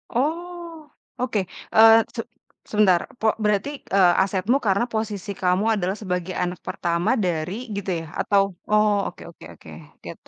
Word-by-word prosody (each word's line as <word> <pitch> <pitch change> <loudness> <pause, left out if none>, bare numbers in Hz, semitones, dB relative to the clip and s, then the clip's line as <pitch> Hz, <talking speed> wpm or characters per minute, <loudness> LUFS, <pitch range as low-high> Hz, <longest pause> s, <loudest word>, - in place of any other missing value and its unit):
Oh, 330 +2 -3 0.3
oke, 230 -5 0 0.3
eee, 225 +1 +8
se 230 - -2 0.5
sebentar, 195 -5 +4 0.2
pok 220 -1 +3
berarti, 210 +5 +1 0.3
eee, 180 -3 +6
asetmu 195 +7 +1
karena 200 +5 +2
posisi 210 -2 -3
kamu 185 +3 +2
adalah 190 -1 -1
sebagai 180 -2 -3
anak 180 0 -4
pertama 170 0 -1 0.2
dari 170 +1 -2 0.2
gitu 200 -1 -4
ya? - - -8
Atau 200 -1 +3 0.3
oh 210 0 +4
oke - - -10
oke - - -16
oke, - - -16 0.4
gitu. - - -10
205 Hz, 145 wpm, -23 LUFS, 180-225 Hz, 0.5 s, eee